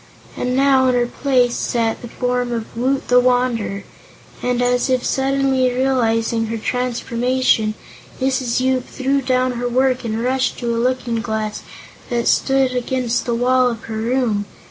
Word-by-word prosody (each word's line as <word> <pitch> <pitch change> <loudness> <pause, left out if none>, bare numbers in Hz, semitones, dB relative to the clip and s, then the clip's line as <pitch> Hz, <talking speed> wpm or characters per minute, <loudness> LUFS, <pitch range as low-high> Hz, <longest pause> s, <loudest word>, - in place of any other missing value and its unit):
And 250 0 -2
now, 265 -1 +4
in 250 - +2
her 245 0 +2
place 250 -1 +1
sat 230 -2 -1
the 240 - -7
form 245 +1 -2
of 230 -2 -5
Woot 260 +3 -1
the 250 0 +5
Wanderer, 245 -5 0 0.6
and 250 -1 0
as 245 +1 +1
if 255 -1 +1
suddenly 270 -1 +1
realizing 230 -3 +1
her 225 +1 -3
transformation 245 -1 0 0.4
Mrs. 260 -2 0
Yoop 255 -1 0
threw 275 +1 -1
down 255 0 +1
her 245 +1 -2
work 255 +1 +1
and 225 0 -2
rushed 260 +1 0
to 235 -1 -2
a 230 - 0
looking 245 -2 -1
glass 220 -2 -3 0.5
that 240 -1 -1
stood 270 -1 +2
against 250 -1 -1
the 235 - 0
wall 250 +1 +3
of 230 -2 -6
her 220 -1 -5
room. 225 -3 0
250 Hz, 160 wpm, -19 LUFS, 235-260 Hz, 0.6 s, the